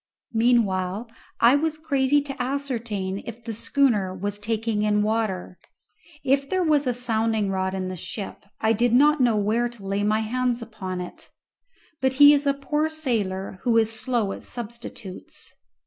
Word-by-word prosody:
Meanwhile 225 -2 +1 0.3
I 235 +4 +6
was 310 +1 0
crazy 290 -2 +2
to 275 -2 -6
ascertain 235 -8 -3
if 235 0 -8
the 230 -1 -5
schooner 215 -5 +1
was 205 +2 -4
taking 220 0 -1
in 210 0 +2
water. 210 -5 -2 0.7
If 275 +1 +2
there 370 -1 +1
was 295 -4 +2
a - - +3
sounding 225 -4 +1
rod 190 0 -1
in 185 -1 -3
the 185 - -4
ship 195 +3 -6 0.2
I 220 +1 +3
did 235 +2 +1
not 295 +3 +5
know 240 -3 +4
where 220 +4 +1
to 235 -5 -12
lay 195 +1 -1
my 215 +1 +2
hands 245 +2 0
upon 190 -5 -5
it. 180 - -9 0.7
But 265 0 +2
he 290 +2 +8
is 290 0 +1
a 280 - +4
poor 295 +3 -1
sailor 205 -12 -2
who 235 -2 +2
is 225 -1 +3
slow 225 -2 -1
at - - -6
substitutes. 235 -5 -9
230 Hz, 165 wpm, -24 LUFS, 205-265 Hz, 0.7 s, he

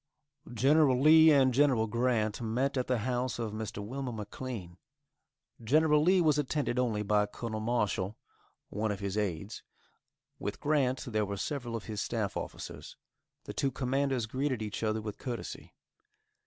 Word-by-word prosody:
Gen. 135 +2 +4
Lee 160 +1 +8
and 135 -4 +5
Gen. 130 -4 +3
Grant 115 -1 0
met 125 +5 0
at 130 -1 -1
the 125 - +1
house 125 0 -1
of 115 -3 -3
Mr. 105 -1 -5
Wilmer 130 +3 -4
McLean. 105 -4 -7 0.8
General 150 +5 +4
Lee 180 +3 +4
was 150 -3 +3
attended 145 -3 -1
only 110 -4 0
by 105 0 +2
Col. 115 +2 -6
Marshal, 110 -3 -1 0.5
one 105 +1 -1
of 100 - -4
his 100 -1 -3
aids; 100 -1 -3 0.8
with 100 - -4
Grant 140 -4 +1
there 110 -3 0
were 100 0 -3
several 120 +1 -3
of 115 - -4
his 105 -2 -4
staff 110 -5 -2
officers. - - -7 0.5
The - - -7
two 140 - 0
commanders 135 -1 0
greeted 130 0 -2
each 105 -1 -5
other 110 -1 -1
with 105 -2 -6
courtesy. 120 -3 -6
120 Hz, 155 wpm, -31 LUFS, 105-135 Hz, 0.8 s, Lee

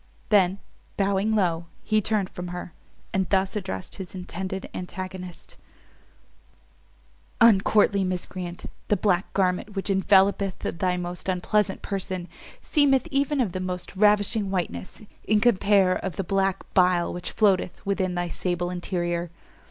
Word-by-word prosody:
Then, 195 -3 +4 0.4
bowing 200 +2 +1
low, 170 -4 +1 0.2
he 215 -1 +2
turned 205 -2 0
from 180 0 -6
her, 175 -1 -6 0.4
and 190 -1 0
thus 190 0 +1
addressed 95 - -4
his 190 -1 -8
intended 190 +1 -5
antagonist: 185 0 -7 1.8
"Uncourtly 205 -2 +5
Miscreant, 180 -1 -4 0.2
The 210 - +2
black 180 -2 +1
garment 190 +2 0
which 195 +1 -1
envellopeth 195 0 +3
thy 180 +1 -1
most 175 +1 -5
unpleasant 190 +2 0
person, 185 -2 -4 0.4
seemeth 285 -2 +3
even 280 +1 +1
of 230 -8 +1
the 185 - -4
most 180 0 -5
ravishing 210 +1 +3
whiteness, 175 - -4 0.2
in 215 0 +3
compare 200 -4 +4
of 190 -5 -5
the 195 - -2
black 195 +1 0
bile 180 -2 +3
which 175 - -5
floateth 195 -4 +1
within 190 -2 0
thy 175 0 -1
sable 175 0 -2
interior. 175 -1 -2
190 Hz, 130 wpm, -25 LUFS, 180-200 Hz, 1.8 s, Uncourtly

